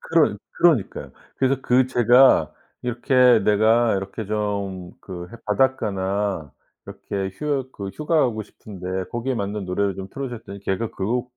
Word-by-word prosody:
그러 - - +2 0.2
그러니까요. 155 - +1 0.2
그래서 135 0 +1
그 125 +1 +3
제가 125 +1 +5 0.3
이렇게 125 0 +4
내가 110 +2 +4
이렇게 95 +3 -5
좀 100 -4 -3
그 90 -2 -8
해 - - -10
바닷가나 100 - 0 0.3
이렇게 95 -1 -4
휴 135 +1 -2
그 100 -1 -6
"휴가 155 - 0
가고 115 -6 0
싶은데 95 -2 -6
거기에 120 +3 -2
맞는 100 -2 -3
노래를 95 +1 -1
좀 95 0 -6
틀어 135 -1 -5
줘."했더니 110 -5 -9
걔가 100 +3 -2
그 115 +6 -1
110 Hz, 305 characters per minute, -23 LUFS, 95-125 Hz, 0.3 s, 제가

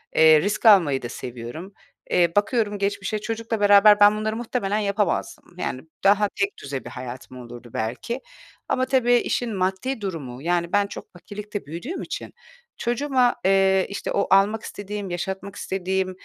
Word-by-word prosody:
Eee, 155 -1 +7
risk 205 +6 -2
almayı 170 -11 +6
da 120 - -5
seviyorum. 125 +10 -8 0.4
Eee, 170 -2 +3
bakıyorum 210 0 +1
geçmişe 200 +1 -2
çocukla 225 0 -3
beraber 205 0 +7
ben 205 +1 +6
bunları 215 0 -2
muhtemelen 225 -3 -2
yapamazdım, 200 -2 -1
yani, 130 -7 -3 0.2
daha 205 +1 +4
tekdüze 140 - -3
bir - - -6
hayatım 125 0 -8
olurdu 120 -1 -11
belki 125 - -3 0.5
ama 255 0 +1
tabii 255 -2 +2
işin 240 -2 0
maddi 190 +7 -2
durumu, 145 -10 -5
yani, 170 +1 -1
ben 205 0 +3
çok - - -10
fakirlikte 205 +2 -7
büyüdüğüm 175 - -6
için - - -6 0.4
çocuğuma, 250 0 +1
eee, 190 0 +4
işte, 200 - -4
o 200 - 0
almak 200 +3 +4
istediğim, 205 -1 -6
yaşatmak 190 +3 -5
istediğim 190 -1 -2
200 Hz, 150 wpm, -23 LUFS, 170-215 Hz, 0.5 s, Eee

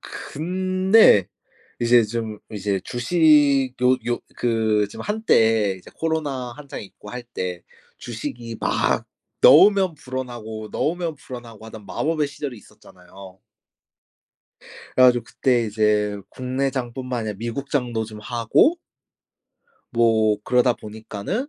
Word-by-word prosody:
근데 185 - +2 0.5
이제 120 0 +5
좀 110 -1 -4
이제 100 -1 -2
주식 140 -1 +3
요 125 +1 +5
요 120 0 -1 0.2
그 110 -3 +1
지금 - - -8
한때 115 - +2
이제 - - -15
코로나 145 -6 -2
한창 145 0 -8
있고 105 +1 -13
할 125 0 -6
때 90 -7 -5 0.4
주식이 115 0 -6
막 - - 0 0.4
넣으면 195 -4 +7
불어나고, 120 -6 -6
넣으면 170 0 -2
불어나고 120 -5 -11
하던 110 -2 -11
마법의 155 +4 -1
시절이 140 -4 -6
있었잖아요. 95 -2 -16 1.6
그래 130 - +6
가지고 120 -2 +4
그때 125 -1 +1
이제 105 -1 +1
국내장뿐만 130 -1 -3
아니라 105 -2 -4
미국장도 120 -1 -2
좀 110 -1 -10
하고 120 - +2 1.2
뭐 110 -2 +3
그러다 125 0 +3
보니까는 110 - -5
120 Hz, 250 characters per minute, -22 LUFS, 110-140 Hz, 1.6 s, 넣으면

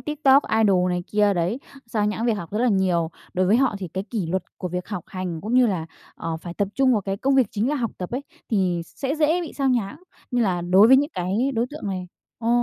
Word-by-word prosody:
TikTok 285 -2 +3 0.2
idol 185 -3 +3
này 180 0 -1
kia 205 -1 +3
đấy, 180 +7 0 0.3
xao 215 -2 0
nhãng 215 +3 -1
việc 235 - +3
học 175 -6 -7
rất 210 - -1
là 250 +2 +3
nhiều. 185 -5 +1 0.2
Đối 185 0 +2
với 205 +5 +4
họ 260 -3 +2
thì 185 -2 -5
cái 190 +4 -4
kỷ 215 -8 -2
luật 185 +2 -1 0.2
của 180 - -3
việc 180 +1 -4
học 190 -6 -5
hành, 180 -3 -5
cũng 220 +6 -3
như 255 -1 +6
là, 180 -7 -2 0.3
ờ, 165 -1 -4
phải 170 +1 -8
tập 200 +1 0
trung 270 -1 +3
vào 220 - +2
cái 195 0 -3
công 270 +6 +1
việc 260 -4 +4
chính 215 +4 -1
là 295 - +1
học 235 -5 -1
tập 180 - -5
ấy 255 +3 -3 0.3
thì 185 -5 +1
sẽ 275 - -3
dễ 320 +2 +2
bị 340 - -6
xao 275 -1 0
nhãng, 235 -5 0 0.3
như 245 -2 +1
là 185 -5 +1
đối 185 +5 +5
với 265 - +8
những 290 +3 +1
cái 200 +10 0
đối 230 +1 +1
tượng 295 -6 -7
này. 185 -2 -4 0.3
Ờ. 230 - -3
205 Hz, 260 wpm, -23 LUFS, 180-250 Hz, 0.3 s, với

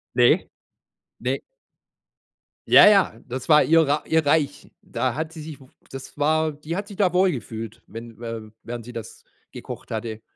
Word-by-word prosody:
Ne - - +4 0.7
ne. - - -1 1.3
Ja - - +9
ja, 195 - +4
das 130 +1 -6
war 150 -2 +6
ihr 165 +1 +5
Rei 145 +1 +1
ihr 160 -1 +2
Reich. 145 -1 0
Da - - -2
hat 160 +2 -4
sie 160 -2 -9
sich 150 -2 -9
w 130 - -16 0.2
das 135 +2 -9
war 155 +1 +2
die 150 +3 -6
hat 200 +2 -4
sich 200 - -11
da 185 -4 +2
wohlgefühlt, 120 - -1
wenn 115 +1 -10
wä 115 -2 -6
während 120 -1 -7
sie 125 - -10
das 115 -3 -9 0.3
gekocht - - -9
hatte. 110 0 -4
145 Hz, 170 wpm, -23 LUFS, 115-160 Hz, 1.3 s, Ja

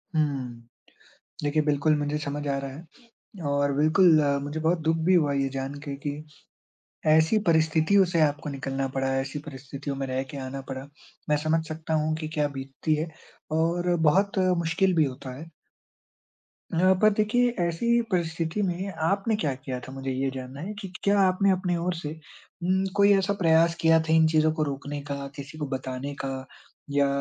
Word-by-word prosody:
हुँ, 130 -6 -2 0.8
देखिए 150 +1 +1
बिल्कुल 150 +1 +2
मुझे 145 +1 -1
समझ 145 0 -4
आ 140 - 0
रहा 135 0 -5
है, 160 - -14 0.5
और 140 0 +1
बिल्कुल 155 +2 +5 0.2
मुझे 145 +2 -4
बहुत 165 +3 +2
दुःख 160 +1 +1
भी 185 - +5
हुआ 150 -5 +3
ये 135 -1 +1
जान 135 +1 -3
के 140 - -3
कि, 145 +1 -4 0.9
ऐसी 160 +7 +4
परिस्थितियों 160 +4 +4
से 170 -2 +1
आपको 150 0 +1
निकलना 135 0 -3
पड़ा, 135 0 -2
ऐसी 135 +2 -4
परिस्थितियों 140 0 -6
में 135 0 -3
रह 130 0 -1
के 140 - -6
आना 135 +1 -5
पड़ा। 135 +1 -6 0.4
मैं 150 - +4
समझ 160 +2 0
सकता 160 0 -4
हूँ 155 0 +1
कि 155 -1 -4
क्या 150 -1 +1
बीतती 135 +2 -2
है, 155 +2 -2 0.4
और 170 +2 +1
बहुत 195 +5 +1 0.3
मुश्किल 170 +3 +2
भी 160 -2 +4
होता 130 -1 -6
है। 165 +2 -10 1.2
हाँ, 185 +3 +4
पर 215 - +7
देखिए 225 +4 +2
ऐसी 180 +8 +2
परिस्थिति 165 +1 -1
में 185 +1 -2 0.2
आपने 200 +4 +1
क्या 155 -10 -1
किया 130 -1 -5
था 130 - -10
मुझे 135 0 -4
ये 135 +1 -1
जानना 130 +2 -7
है 200 +6 -5
कि 195 - -7
क्या 200 0 +3
आपने 190 +1 +3
अपनी 185 -1 0
ओर 175 +1 -1
से 160 -3 -5 0.5
उम्म, 190 +2 +2
कोई 200 0 +5
ऐसा 195 +1 +1
प्रयास 165 0 +4
किया 165 0 +5
था 160 0 0
इन 160 0 +6
चीज़ों 155 0 +3
को 155 -1 0
रोकने 145 0 -4
का, 140 -1 -5
किसी 140 +2 -9
को 150 - -3
बताने 130 +1 -4
का, 135 -1 -4 0.5
या 140 0 +3
155 Hz, 180 wpm, -26 LUFS, 140-170 Hz, 1.2 s, पर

